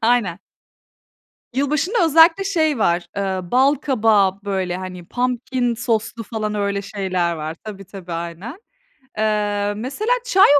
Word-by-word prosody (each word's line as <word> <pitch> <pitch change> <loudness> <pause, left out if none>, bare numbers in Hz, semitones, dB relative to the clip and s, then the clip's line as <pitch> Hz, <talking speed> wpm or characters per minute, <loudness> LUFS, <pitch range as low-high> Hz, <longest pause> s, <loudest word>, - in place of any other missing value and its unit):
Aynen. 225 -7 +2 1.2
Yılbaşında 305 - +1
özellikle 330 +4 +6
şey 315 - +1
var, 175 -3 +1
ııı, 190 -3 -2
bal 270 +3 +4
kabağı, 215 -8 +2
böyle, 190 -3 -1
hani, 185 -1 -7
pumpkin 250 0 -1
soslu, 230 0 -1
falan, 215 -1 -3
öyle 200 -1 -1
şeyler 185 -4 -1
var. 155 +1 -5
Tabii, 200 -2 -8
tabii 180 -2 -9
aynen. 170 - -6 0.6
Eee, 205 -1 0
mesela 275 - -2
çay 395 -6 +5
215 Hz, 125 wpm, -21 LUFS, 190-265 Hz, 1.2 s, özellikle